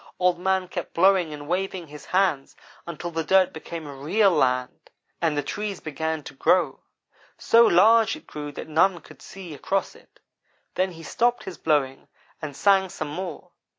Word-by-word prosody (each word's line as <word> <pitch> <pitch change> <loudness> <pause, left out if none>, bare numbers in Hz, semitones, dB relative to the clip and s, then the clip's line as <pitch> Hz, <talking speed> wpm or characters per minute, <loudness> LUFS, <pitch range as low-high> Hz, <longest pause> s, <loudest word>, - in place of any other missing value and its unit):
Old 180 -1 +2
man 190 0 0
kept 175 -1 -6
blowing 185 -2 +4
and 145 -1 -8
waving 185 0 -2
his 150 -1 -12
hands 180 -8 0 0.3
until 170 +1 -6
the 165 0 -2
dirt 185 +2 +3
became 160 0 -7
real 195 +7 +3
land, 125 -5 0 0.3
and 160 -3 +1
the 145 - 0
trees 205 +3 -4
began 160 0 -3
to - - -10
grow. 155 0 +2 0.6
So 230 0 +5
large 220 +5 +5
it - - -14
grew 145 -1 -7
that - - -7
none 170 +3 +2
could - - -16
see 185 -5 -10
across 190 +7 -2
it. - - -22 0.5
Then 185 0 0
he 165 0 -11
stopped 240 +7 0
his 190 - -8
blowing 140 -4 0 0.3
and 150 -3 -6
sang 195 +1 +3
some 155 -3 -5
more. 175 +1 -6
175 Hz, 170 wpm, -24 LUFS, 150-190 Hz, 0.6 s, So